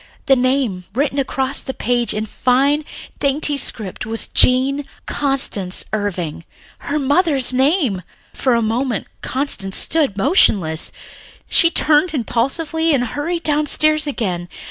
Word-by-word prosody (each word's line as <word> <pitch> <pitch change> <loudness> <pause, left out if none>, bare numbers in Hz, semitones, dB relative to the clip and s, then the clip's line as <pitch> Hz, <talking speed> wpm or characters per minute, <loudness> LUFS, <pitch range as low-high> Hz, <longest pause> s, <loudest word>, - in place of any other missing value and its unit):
The 275 -3 +5
name 250 -8 0
written 280 +1 0
across 265 0 -1
the 265 - -6
page 240 -1 0
in 215 - -2
a - - -4
fine, 275 +7 +1 0.3
dainty 285 +1 +2
script 215 -8 -1
was 225 +1 -2
"Jean 265 +3 +4 0.2
Constance 265 -10 -1
Irving," 180 -7 -3 0.4
her 290 - -3
mother's 285 -2 +1
name! 265 - +1 0.3
For 255 -3 +1
a 235 - +1
moment 235 +1 -1 0.2
Constance 255 -8 -3
stood 295 -11 +1
motionless. 195 - +2
Then - - -20
she 335 - +5
turned 310 0 +2
impulsively 300 +6 0
and 250 - 0
hurried 325 +8 -3
downstairs 305 0 +1
again. 180 -10 -3
Mr. - - -15
265 Hz, 135 wpm, -18 LUFS, 220-295 Hz, 0.4 s, The